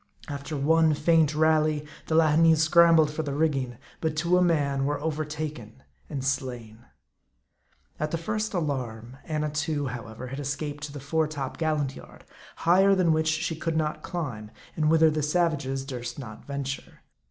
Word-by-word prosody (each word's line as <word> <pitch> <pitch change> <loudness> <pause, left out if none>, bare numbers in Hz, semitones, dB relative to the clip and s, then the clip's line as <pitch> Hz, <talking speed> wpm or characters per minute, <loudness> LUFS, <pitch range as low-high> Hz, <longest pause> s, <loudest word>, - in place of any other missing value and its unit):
After 145 +1 -5
one 160 +2 +3
faint 155 0 +3
rally, 155 -1 +2 0.2
the 160 - 0
Lahineese 160 0 +5
scrambled 165 -2 +5
for 155 - -3
the 140 -3 -4
rigging; 135 -6 0 0.2
but 160 -1 -1
to 170 +3 +2
a 180 - +4
man 145 -6 +1
were 145 0 -1
overtaken 150 - -4 0.3
and 135 -2 -4
slain. 120 -4 -3 1.1
At 150 - -1
the 165 - -1
first 215 +5 -3
alarm, 130 -7 -3
Annatoo, 150 -2 -1
however, 115 -1 -7
had 135 +2 -6
escaped 145 +1 -4
to 150 - -8
the 145 - -7
fore 155 +3 0
top 140 -3 -5
gallant 150 -4 0
yard, - - -14 0.3
higher 195 +4 +4
than 175 -4 +3
which 160 0 +1
she 155 +1 0
could 165 0 -2
not 155 -1 -1
climb, 130 - -5 0.3
and 155 -1 +2
whither 160 0 +5
the 155 0 -1
savages 150 -4 0
durst 120 -3 -6
not 115 -6 -9
venture. 140 -1 -5
150 Hz, 160 wpm, -27 LUFS, 135-160 Hz, 1.1 s, Lahineese